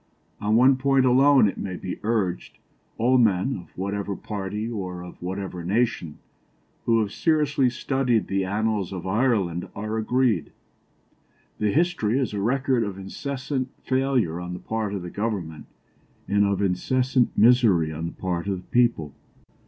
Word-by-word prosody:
"On 105 Hz, +1 st, +1 dB
one 130 Hz, +3 st, +5 dB
point 135 Hz, 0 st, +3 dB
alone 130 Hz, -1 st, +5 dB
(it 100 Hz, -, -4 dB
may 95 Hz, -2 st, -4 dB
be 90 Hz, -, -6 dB
urged) 105 Hz, -5 st, -2 dB, 0.4 s
all 125 Hz, +3 st, +3 dB
men, 110 Hz, +3 st, +2 dB
of 90 Hz, -, -14 dB
whatever 100 Hz, +1 st, -3 dB
party 105 Hz, +2 st, -4 dB
or 90 Hz, -6 st, -5 dB
of 90 Hz, -, -12 dB
whatever 95 Hz, -1 st, -5 dB
nation, 95 Hz, -5 st, -1 dB, 0.7 s
who 115 Hz, -1 st, +3 dB
have 105 Hz, -2 st, -2 dB
seriously 150 Hz, -4 st, +2 dB
studied 125 Hz, -2 st, 0 dB
the 95 Hz, 0 st, -1 dB
annals 105 Hz, 0 st, -1 dB
of 95 Hz, -2 st, -6 dB
Ireland 95 Hz, -5 st, 0 dB
are 110 Hz, +2 st, -3 dB
agreed 120 Hz, +1 st, +1 dB, 1.1 s
the 105 Hz, -, +1 dB
history 145 Hz, -, +1 dB
is 130 Hz, -6 st, -1 dB
a 100 Hz, -, -2 dB
record 130 Hz, +2 st, +1 dB
of 100 Hz, -3 st, -4 dB
incessant 130 Hz, +6 st, -4 dB
failure 130 Hz, -10 st, 0 dB
on 90 Hz, 0 st, -5 dB
the 90 Hz, -, -6 dB
part 110 Hz, -1 st, -3 dB
of 95 Hz, -, -4 dB
the 90 Hz, -, -7 dB
Government, 95 Hz, -8 st, -4 dB, 0.6 s
and 100 Hz, +1 st, +3 dB
of 100 Hz, 0 st, 0 dB
incessant 125 Hz, +7 st, +1 dB
misery 105 Hz, -9 st, +4 dB
on 80 Hz, +2 st, -4 dB
the -, -, -7 dB
part 90 Hz, 0 st, -3 dB
of 95 Hz, -2 st, -1 dB
the 90 Hz, -, -13 dB
people. 115 Hz, -, +2 dB
105 Hz, 155 wpm, -24 LUFS, 95-125 Hz, 1.1 s, one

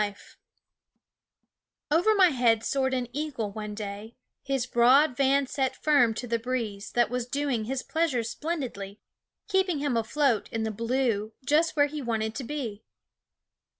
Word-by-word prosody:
||\ -, -, +4 dB, 1.9 s
VER 355 Hz, +8 st, +4 dB
my 375 Hz, -3 st, +6 dB
head 235 Hz, -5 st, +2 dB
soared 265 Hz, -1 st, 0 dB
an 250 Hz, -1 st, -2 dB
eagle 270 Hz, -8 st, -3 dB
one 210 Hz, 0 st, -6 dB
day, 205 Hz, +1 st, -7 dB, 0.3 s
his 270 Hz, -3 st, -1 dB
broad 255 Hz, +3 st, +4 dB
vans 275 Hz, 0 st, +2 dB
set 265 Hz, -2 st, 0 dB
firm 285 Hz, -7 st, +3 dB
to 245 Hz, -, -4 dB
the 230 Hz, -1 st, -1 dB
breeze 225 Hz, -4 st, -3 dB
that 240 Hz, -2 st, +2 dB
was 250 Hz, -1 st, -2 dB
doing 275 Hz, -4 st, -1 dB
his 260 Hz, +2 st, -3 dB
pleasure 320 Hz, -7 st, 0 dB
splendidly, 230 Hz, -7 st, -5 dB, 0.5 s
keeping 380 Hz, -4 st, +1 dB
him 280 Hz, -3 st, -1 dB
afloat 230 Hz, +1 st, +1 dB
in 225 Hz, -1 st, -2 dB
the 220 Hz, -, -1 dB
blue, 230 Hz, -1 st, -1 dB
just 310 Hz, +4 st, +2 dB
where 290 Hz, -1 st, +5 dB
he 295 Hz, +1 st, -5 dB
wanted 220 Hz, -3 st, -2 dB
to 265 Hz, -, -5 dB
be. 235 Hz, -6 st, -5 dB
250 Hz, 150 wpm, -27 LUFS, 225-285 Hz, 1.9 s, my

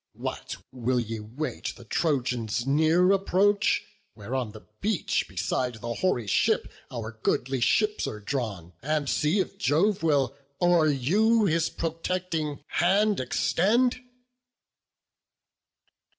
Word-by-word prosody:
What! -, -, -5 dB, 0.2 s
will 125 Hz, 0 st, 0 dB
ye 115 Hz, -1 st, -4 dB
wait 120 Hz, +9 st, -5 dB
the 120 Hz, -, -14 dB
Trojans' 120 Hz, -5 st, -1 dB
near 160 Hz, +6 st, +4 dB
approach, 200 Hz, +1 st, +2 dB, 0.3 s
Where 110 Hz, +3 st, -8 dB
on 125 Hz, -5 st, -1 dB
the 110 Hz, 0 st, -13 dB, 0.2 s
beach, 210 Hz, -4 st, 0 dB
beside 125 Hz, -2 st, -1 dB
the 120 Hz, +2 st, -5 dB
hoary 125 Hz, -5 st, 0 dB
deep, 100 Hz, -, +2 dB, 0.2 s
Our 115 Hz, -2 st, -7 dB
goodly 130 Hz, +1 st, 0 dB
ships 210 Hz, -, +2 dB
are 105 Hz, -, -5 dB
drawn, 100 Hz, -7 st, -4 dB
and 150 Hz, +1 st, -1 dB
see 150 Hz, +8 st, +1 dB
if 195 Hz, +1 st, -3 dB
Jove 195 Hz, +3 st, +2 dB
Will 140 Hz, -5 st, +2 dB, 0.2 s
o'er 175 Hz, -3 st, +4 dB
you 205 Hz, -, +3 dB
his 165 Hz, -2 st, +1 dB
protecting 165 Hz, -3 st, -3 dB
hand 200 Hz, +4 st, +2 dB
extend?" 230 Hz, -, +2 dB
150 Hz, 120 wpm, -27 LUFS, 120-185 Hz, 0.3 s, near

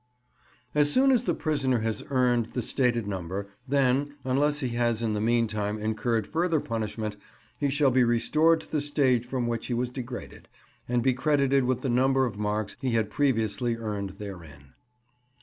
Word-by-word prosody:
As 145 Hz, 0 st, +4 dB
soon 270 Hz, -, +5 dB
as 250 Hz, -4 st, +2 dB
the 175 Hz, -, +1 dB
prisoner 140 Hz, -6 st, 0 dB
has 110 Hz, -1 st, -2 dB
earned 125 Hz, -4 st, +1 dB
the 125 Hz, -, -2 dB
stated 120 Hz, -3 st, +1 dB
number, 95 Hz, 0 st, -4 dB, 0.2 s
then, 140 Hz, +1 st, +1 dB
unless 145 Hz, +3 st, +1 dB
he 130 Hz, -, -1 dB
has 120 Hz, -1 st, 0 dB
in 110 Hz, -2 st, 0 dB
the 105 Hz, -, -1 dB
meantime 110 Hz, -2 st, 0 dB
incurred 110 Hz, +1 st, -1 dB
further 165 Hz, -, 0 dB
punishment, 110 Hz, -3 st, -4 dB, 0.4 s
he 145 Hz, -, +1 dB
shall 140 Hz, -1 st, +3 dB
be 125 Hz, 0 st, +4 dB
restored 150 Hz, +8 st, +3 dB
to -, -, -15 dB
the 150 Hz, -, 0 dB
stage 130 Hz, -5 st, +1 dB
from 125 Hz, -1 st, -2 dB
which 115 Hz, -1 st, -2 dB
he 120 Hz, -, -1 dB
was 125 Hz, +1 st, -1 dB
degraded, 125 Hz, -1 st, -8 dB, 0.4 s
and 120 Hz, -1 st, +1 dB
be 130 Hz, 0 st, +3 dB
credited 140 Hz, 0 st, +2 dB
with 125 Hz, -1 st, 0 dB
the 135 Hz, -, -2 dB
number 130 Hz, +2 st, +3 dB
of 105 Hz, -4 st, -5 dB
marks 105 Hz, 0 st, -2 dB
he 130 Hz, -3 st, -1 dB
had 110 Hz, -2 st, 0 dB
previously 120 Hz, -3 st, 0 dB
earned 100 Hz, -4 st, -4 dB
therein. 80 Hz, -10 st, -10 dB
120 Hz, 175 wpm, -27 LUFS, 110-135 Hz, 0.4 s, soon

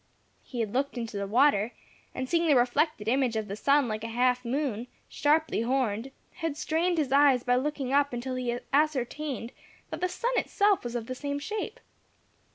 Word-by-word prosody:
He 245 Hz, -3 st, -4 dB
had 215 Hz, -2 st, -3 dB
looked 275 Hz, +1 st, -1 dB
into 230 Hz, -3 st, -4 dB
the 200 Hz, 0 st, -2 dB
water, 235 Hz, -1 st, +3 dB, 0.4 s
and 260 Hz, 0 st, -3 dB
seeing 335 Hz, +3 st, +1 dB
the 295 Hz, -, +5 dB
reflected 250 Hz, -1 st, +1 dB
image 250 Hz, -1 st, +2 dB
of 220 Hz, -1 st, -2 dB
the 200 Hz, -, -4 dB
sun 280 Hz, +4 st, +3 dB
like 215 Hz, -1 st, -3 dB
a -, -, -3 dB
half 250 Hz, +2 st, +1 dB
moon, 250 Hz, -2 st, -2 dB, 0.2 s
sharply 305 Hz, -4 st, +1 dB
horned, 240 Hz, -1 st, 0 dB, 0.3 s
had 325 Hz, -4 st, -3 dB
strained 330 Hz, +3 st, 0 dB
his 290 Hz, -5 st, 0 dB
eyes 275 Hz, -3 st, +5 dB
by 245 Hz, 0 st, +2 dB
looking 270 Hz, 0 st, -1 dB
up 285 Hz, 0 st, +3 dB
until 250 Hz, +2 st, -4 dB
he 245 Hz, -1 st, -2 dB, 0.2 s
ascertained 285 Hz, -3 st, 0 dB, 0.4 s
that -, -, -5 dB
the 365 Hz, -, +1 dB
sun 470 Hz, +7 st, -2 dB
itself 405 Hz, -2 st, +2 dB
was 240 Hz, 0 st, -5 dB
of 235 Hz, -2 st, -2 dB
the 255 Hz, -, -4 dB
same 285 Hz, +2 st, -3 dB
shape. 430 Hz, +9 st, -4 dB
260 Hz, 185 wpm, -28 LUFS, 240-300 Hz, 0.4 s, the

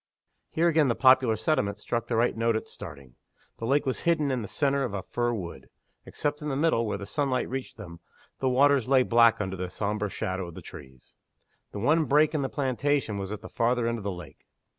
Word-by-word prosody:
Here 165 Hz, +2 st, +1 dB
again 160 Hz, -3 st, +3 dB
the 120 Hz, -, +1 dB
popular 130 Hz, -3 st, +5 dB
sentiment 105 Hz, -9 st, 0 dB
struck 115 Hz, +2 st, -3 dB
the 120 Hz, -, -1 dB
right 120 Hz, +2 st, +2 dB
note 115 Hz, 0 st, +1 dB
at 110 Hz, -, -3 dB
starting. 65 Hz, -4 st, -11 dB, 0.4 s
The 115 Hz, -, -3 dB
lake 145 Hz, +3 st, +2 dB
was 130 Hz, -, -1 dB
hidden 155 Hz, -4 st, +1 dB
in 130 Hz, -2 st, -1 dB
the 105 Hz, -, -6 dB
centre 140 Hz, +1 st, 0 dB
of 115 Hz, -6 st, -3 dB
a 95 Hz, -, -4 dB
fir 120 Hz, 0 st, -1 dB
wood. 95 Hz, -7 st, -6 dB, 0.4 s
Except 145 Hz, 0 st, -3 dB
in 150 Hz, -, -3 dB
the 135 Hz, -, -1 dB
middle, 140 Hz, -6 st, +1 dB
where 105 Hz, -, -2 dB
the 100 Hz, -, -7 dB
sunlight 135 Hz, 0 st, -1 dB
reached 130 Hz, -1 st, -6 dB
them, 85 Hz, -6 st, -10 dB, 0.4 s
the 130 Hz, -, +1 dB
waters 135 Hz, -1 st, +3 dB
lay 130 Hz, -2 st, +5 dB
black 115 Hz, -1 st, +4 dB
under 95 Hz, -2 st, -3 dB
the 90 Hz, -1 st, -4 dB
sombre 105 Hz, +2 st, -2 dB
shadow 95 Hz, -1 st, -3 dB
of 85 Hz, -, -11 dB
the -, -, -8 dB
trees. 65 Hz, -2 st, -13 dB, 0.6 s
The -, -, -7 dB
one 150 Hz, +9 st, +2 dB
break 150 Hz, +2 st, +3 dB
in 150 Hz, -, 0 dB
the 135 Hz, -, -2 dB
plantation 135 Hz, -5 st, -1 dB
was 95 Hz, 0 st, -5 dB
at 105 Hz, -, -5 dB
the -, -, -9 dB
farther 120 Hz, 0 st, 0 dB
end 115 Hz, 0 st, -1 dB
of -, -, -9 dB
the 100 Hz, -, -2 dB
lake. 90 Hz, -6 st, -11 dB
120 Hz, 225 wpm, -27 LUFS, 100-140 Hz, 0.6 s, popular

